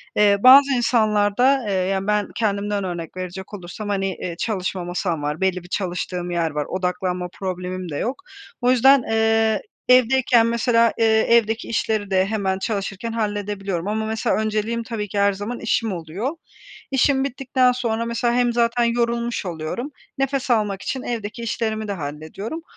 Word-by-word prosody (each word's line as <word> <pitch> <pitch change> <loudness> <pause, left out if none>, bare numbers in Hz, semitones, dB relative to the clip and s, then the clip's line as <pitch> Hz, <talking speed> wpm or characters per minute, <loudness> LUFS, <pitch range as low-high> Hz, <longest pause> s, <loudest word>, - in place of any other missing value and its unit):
Eee, 205 -1 +5
bazı 275 +2 +8
insanlar 215 -5 +2
da, 265 0 +3
eee, - - 0
yani 190 +1 0
ben 210 -1 +1
kendimden 205 -2 -1
örnek 175 -2 -5
verecek 185 +2 -6
olursam 205 +2 -7
hani, 195 -1 0
eee, 170 - -5
çalışma 190 -4 -2
masam 175 -2 -2
var 150 +3 -3
belli 185 -2 0
bir 180 - -14
çalıştığım 180 -1 -3
yer 170 -2 0
var 150 0 -2
odaklanma 180 -1 -2
problemim 185 -1 -5
de 145 - -4
yok. 260 - -3 0.4
O 245 +1 +3
yüzden, 265 +1 +5
eee, 225 0 +2 0.3
evdeyken 250 -1 +5
mesela, 230 0 +2
eee, 225 - +3 0.2
evdeki 225 -1 +2
işleri 215 -3 -1
de 190 0 +3
hemen 195 -2 -1
çalışırken 200 +1 -3
halledebiliyorum 205 -4 -3
ama 220 +1 -1
mesela 220 0 0
önceliğim 215 +2 -1
tabii 225 -3 -4
ki 200 +1 -3
her 200 0 +3
zaman 205 +5 -5
işim 225 0 0
oluyor. 185 - -4 0.6
İşim 265 0 +3
bittikten 260 -1 +1
sonra 230 -2 -2
mesela 235 +1 0
hem 245 -1 +2
zaten 235 0 +2
yorulmuş 235 -1 0
oluyorum, 175 - -4 0.3
nefes 270 -1 -1
almak 205 -4 +1
için 260 -1 -4
evdeki 230 0 -4
işlerimi 220 -1 -2
de 200 - -2
hallediyorum. 160 - -6
215 Hz, 160 wpm, -22 LUFS, 190-235 Hz, 0.6 s, bazı